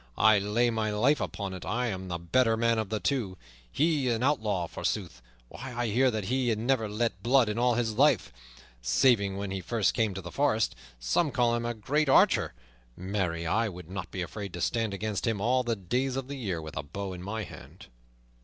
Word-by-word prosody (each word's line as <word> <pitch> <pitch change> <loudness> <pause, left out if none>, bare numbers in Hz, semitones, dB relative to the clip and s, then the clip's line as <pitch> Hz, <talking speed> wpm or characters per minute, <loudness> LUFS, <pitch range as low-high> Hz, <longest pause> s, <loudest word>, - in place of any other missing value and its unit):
I 110 -2 +6
lay 110 +4 +1
my 110 -1 -1
life 120 +8 +2
upon 100 -2 -4
it 95 - -7
I 125 +3 -1
am 95 -2 -5
the 85 -1 -3
better 115 +7 +2
man 115 0 +2
of 110 -3 -3
the 110 0 -1
two. 110 -10 -1 0.3
He 150 -4 +1
an 115 0 0
outlaw, 110 -10 +1
forsooth! - - -3 0.3
Why, 130 - -8
I 120 0 -1
hear 130 +5 +3
that 110 -3 -2
he 125 +4 0
hath 110 - +1
never 115 -1 0
let 105 -2 -1
blood 125 +2 +4
in 105 +2 -2
all 120 0 +3
his 115 -2 0
life, 140 - +3 0.5
saving 100 - +3
when 100 -1 -4
he 95 -1 -3
first 105 +4 +1
came 110 -5 0
to 95 - -4
the 90 0 -8
forest. 135 -6 +1 0.2
Some 105 - +1
call 120 -3 +2
him 120 0 -1
a 120 - -2
great 140 +7 0
archer; 130 - +4 0.4
marry, 90 -3 -2
I 110 +7 +1
would 90 -2 -10
not 90 -2 -5
be 90 - -3
afraid 100 0 -7
to 85 - -5
stand 115 +3 0
against 100 +1 -3
him 110 -3 0
all 125 +5 +2
the 120 -2 -1
days 125 +7 -1
of 135 -1 -3
the 140 - -5
year 95 - -3
with 80 - -8
a - - 0
bow 95 +7 -6
in 90 - -8
my 105 +4 -4
hand." - - -12
110 Hz, 220 wpm, -29 LUFS, 95-120 Hz, 0.5 s, I